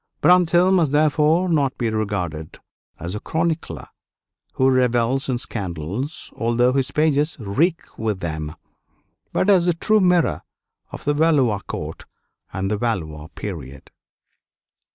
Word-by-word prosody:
Brantôme 180 Hz, +1 st, +5 dB
must 160 Hz, -6 st, +2 dB
therefore 155 Hz, +4 st, +3 dB
not 145 Hz, -6 st, +1 dB
be 115 Hz, -3 st, -1 dB
regarded 90 Hz, -8 st, -3 dB, 0.4 s
as 85 Hz, +2 st, -5 dB
a 105 Hz, -, -3 dB
chronicler 165 Hz, +4 st, -2 dB, 0.7 s
who 130 Hz, -, +2 dB
revels 130 Hz, +1 st, +2 dB
in 125 Hz, -, +1 dB
scandals, 100 Hz, -, -5 dB
although 120 Hz, +3 st, +2 dB
his 135 Hz, -1 st, +1 dB
pages 150 Hz, 0 st, +1 dB
reek 150 Hz, -, -1 dB
with 110 Hz, -3 st, -1 dB
them; 80 Hz, -3 st, -4 dB, 0.8 s
but -, -, 0 dB
as 185 Hz, -4 st, +4 dB
the 175 Hz, -, +3 dB
true 215 Hz, +6 st, +2 dB
mirror 175 Hz, -, +2 dB, 0.5 s
of -, -, -8 dB
the 145 Hz, -, +2 dB
Valois 145 Hz, -9 st, +2 dB
court -, -, -6 dB, 0.5 s
and 95 Hz, +1 st, -2 dB
the 105 Hz, -, 0 dB
Valois 80 Hz, -10 st, -3 dB
period. 70 Hz, -9 st, -8 dB
125 Hz, 130 wpm, -22 LUFS, 100-160 Hz, 0.8 s, Brantôme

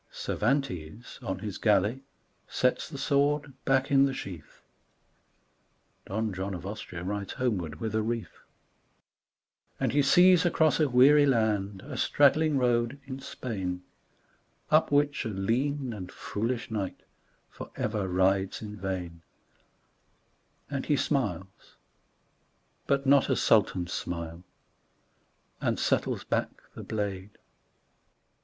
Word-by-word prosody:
Cervantes 115 Hz, -, -2 dB
on 95 Hz, -6 st, -3 dB
his 105 Hz, -3 st, -6 dB
galley 105 Hz, +4 st, +2 dB, 0.5 s
sets 125 Hz, 0 st, 0 dB
the 145 Hz, -, -7 dB
sword 145 Hz, 0 st, +1 dB
back 135 Hz, +1 st, +2 dB
in 135 Hz, 0 st, +6 dB
the 135 Hz, -1 st, -1 dB
sheath, 85 Hz, -, -9 dB, 1.4 s
(Don 110 Hz, +1 st, -2 dB
John 95 Hz, +1 st, -4 dB
of 90 Hz, -, -8 dB
Austria 95 Hz, -4 st, -6 dB
rides 100 Hz, +1 st, -4 dB
homeward 90 Hz, -, -2 dB
with 110 Hz, -1 st, -3 dB
a 110 Hz, -, +1 dB
wreath,) 115 Hz, +1 st, -4 dB, 1.4 s
And -, -, +1 dB
he 145 Hz, -, +3 dB
sees 180 Hz, +5 st, +6 dB
across 160 Hz, -3 st, +2 dB
a 150 Hz, -3 st, +3 dB
weary 140 Hz, +4 st, +6 dB
land 105 Hz, -6 st, 0 dB
a -, -, -7 dB
straggling 150 Hz, +1 st, +3 dB
road 120 Hz, +1 st, +1 dB
in 135 Hz, -1 st, -6 dB
Spain, 95 Hz, -9 st, -5 dB, 0.9 s
Up 155 Hz, 0 st, +4 dB
which 145 Hz, 0 st, +2 dB
a -, -, -3 dB
lean 125 Hz, +7 st, -1 dB
and 95 Hz, -4 st, -7 dB
foolish 115 Hz, +3 st, -3 dB
knight 100 Hz, -4 st, -3 dB, 0.5 s
forever 105 Hz, -3 st, -4 dB
rides 95 Hz, +1 st, +1 dB
in 105 Hz, -1 st, -7 dB
vain, 90 Hz, -4 st, -5 dB, 1.5 s
And 140 Hz, -2 st, -4 dB
he 145 Hz, -, +3 dB
smiles, 100 Hz, -, -3 dB, 1.1 s
but 140 Hz, 0 st, +1 dB
not 140 Hz, 0 st, +4 dB
as -, -, +2 dB
Sultans 95 Hz, -5 st, +2 dB
smile, 85 Hz, 0 st, -5 dB, 1.2 s
and -, -, 0 dB
settles -, -, 0 dB
back -, -, 0 dB, 0.2 s
the -, -, -8 dB
blade 100 Hz, -2 st, -4 dB
110 Hz, 120 wpm, -28 LUFS, 95-135 Hz, 1.5 s, in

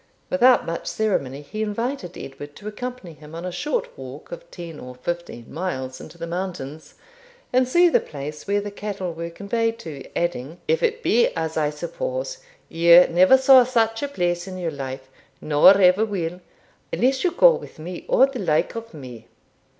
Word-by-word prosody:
Without 255 Hz, -2 st, +5 dB
much 165 Hz, 0 st, -4 dB
ceremony 145 Hz, -11 st, -1 dB
he 215 Hz, +9 st, -6 dB
invited 220 Hz, -2 st, -3 dB
Edward 145 Hz, +2 st, -9 dB
to 210 Hz, -, -10 dB
accompany 245 Hz, -4 st, -6 dB
him 150 Hz, +1 st, -13 dB
on 170 Hz, +2 st, -6 dB
a 180 Hz, -, -3 dB
short 485 Hz, -, -3 dB
walk -, -, -10 dB
of -, -, -9 dB
ten 170 Hz, -4 st, -9 dB
or 125 Hz, 0 st, -9 dB
fifteen 170 Hz, -3 st, -6 dB
miles 130 Hz, -7 st, -4 dB
into 170 Hz, -, -12 dB
the 170 Hz, -, -5 dB
mountains, 170 Hz, -4 st, -6 dB, 0.6 s
and 255 Hz, 0 st, +3 dB
see 345 Hz, +7 st, +5 dB
the 340 Hz, -, +4 dB
place 150 Hz, +3 st, -8 dB
where 205 Hz, +1 st, +1 dB
the 205 Hz, 0 st, -6 dB
cattle 200 Hz, -4 st, -5 dB
were 170 Hz, +1 st, -5 dB
conveyed 225 Hz, +6 st, -2 dB
to; 155 Hz, -11 st, -8 dB
adding, 170 Hz, -2 st, -2 dB
'If 475 Hz, +2 st, +2 dB
it 470 Hz, 0 st, 0 dB
be 480 Hz, -, +4 dB
as 160 Hz, 0 st, -3 dB
I 150 Hz, -2 st, +1 dB
suppose, -, -, -4 dB, 0.3 s
you 170 Hz, +2 st, +7 dB
never 185 Hz, +9 st, +6 dB
saw 265 Hz, -1 st, +7 dB
such 225 Hz, -2 st, +1 dB
a 285 Hz, -, -1 dB
place 175 Hz, -9 st, -1 dB
in 185 Hz, -1 st, -6 dB
your 175 Hz, -3 st, -2 dB
life, 135 Hz, -2 st, -6 dB, 0.3 s
nor 155 Hz, +6 st, +6 dB
ever 185 Hz, +2 st, +5 dB
will, 180 Hz, -4 st, -3 dB, 0.5 s
unless 260 Hz, +2 st, +1 dB
you 365 Hz, -, +3 dB
go -, -, +6 dB
with -, -, -8 dB
me 170 Hz, +3 st, -7 dB
or 265 Hz, -, +5 dB
the 270 Hz, -2 st, -6 dB
like 160 Hz, -6 st, +1 dB
of 230 Hz, -5 st, -8 dB
me.' 125 Hz, -6 st, -10 dB
185 Hz, 180 wpm, -23 LUFS, 160-250 Hz, 0.6 s, you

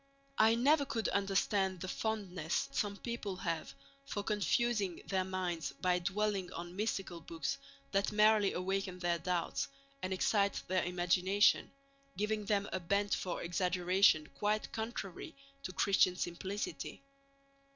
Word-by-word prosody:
I 220 Hz, +1 st, +6 dB
never 285 Hz, +5 st, +4 dB
could 230 Hz, -5 st, -1 dB
understand 195 Hz, -1 st, +1 dB
the 185 Hz, -, -4 dB
fondness 190 Hz, -6 st, -2 dB
some 200 Hz, -1 st, -1 dB
people 235 Hz, -5 st, -4 dB
have 170 Hz, -3 st, -3 dB, 0.3 s
for 210 Hz, -7 st, -4 dB
confusing 210 Hz, -2 st, 0 dB
their 190 Hz, -1 st, 0 dB
minds 180 Hz, -5 st, -2 dB
by 180 Hz, +5 st, +1 dB
dwelling 200 Hz, 0 st, -1 dB
on 175 Hz, +1 st, -6 dB
mystical 195 Hz, -4 st, -2 dB
books 165 Hz, -2 st, -3 dB, 0.3 s
that 195 Hz, +1 st, +1 dB
merely 210 Hz, -1 st, +5 dB
awaken 190 Hz, 0 st, -2 dB
their 175 Hz, -1 st, 0 dB
doubts 175 Hz, 0 st, -1 dB, 0.3 s
and 185 Hz, -, -3 dB
excite 200 Hz, +1 st, +1 dB
their 185 Hz, -1 st, +1 dB
imagination, 180 Hz, +3 st, +3 dB, 0.5 s
giving 210 Hz, 0 st, -1 dB
them 200 Hz, -1 st, +1 dB
a 185 Hz, -, 0 dB
bent 200 Hz, +3 st, +1 dB
for 180 Hz, -, -2 dB
exaggeration 180 Hz, -1 st, +3 dB
quite 210 Hz, +1 st, 0 dB
contrary 220 Hz, -, -5 dB, 0.3 s
to 185 Hz, -, -5 dB
Christian 185 Hz, -1 st, +3 dB
simplicity. 190 Hz, +9 st, -4 dB
195 Hz, 130 wpm, -34 LUFS, 180-210 Hz, 0.5 s, I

